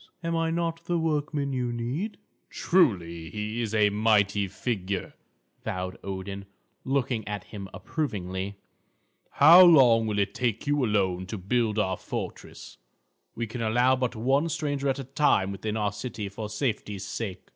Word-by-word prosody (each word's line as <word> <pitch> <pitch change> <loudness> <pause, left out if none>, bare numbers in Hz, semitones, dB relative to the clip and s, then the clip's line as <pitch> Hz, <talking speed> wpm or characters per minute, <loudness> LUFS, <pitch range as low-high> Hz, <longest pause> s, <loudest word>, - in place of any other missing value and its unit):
Am 165 0 -1
I 165 0 +1
not 165 0 -2
the 175 0 0
workman 150 -3 -1
you 125 -2 -1
need?" 130 - -3 0.3
"Truly, 85 - +1
he 105 +2 -3
is 110 -1 -2
a 105 -1 +4
mighty 105 -1 +2
figure," 95 -1 -3 0.5
vowed 90 0 -3
Odin, 100 +1 -5 0.4
looking 130 -4 -1
at 105 -2 -4
him 100 -3 -9
approvingly. 100 - -4 0.8
"How 165 +6 +9
long 125 -10 +6
will 105 -1 -1
it 100 0 0
take 115 -2 -1
you 145 -1 +1
alone 95 -5 0
to 110 - -5
build 110 +3 0
our 95 -3 +1
fortress? - - -7 0.6
We 115 - -2
can 115 +2 -6
allow 120 +4 +3
but 125 -1 -2
one 135 +8 +1
stranger 145 -4 -1
at 135 - 0
a 135 - -4
time 130 -7 +2
within 105 +3 -3
our 105 -1 0
city, 105 -1 -5
for 105 +1 -6
safety's 105 -4 -3
sake." 95 -3 -5
110 Hz, 155 wpm, -27 LUFS, 100-140 Hz, 0.8 s, How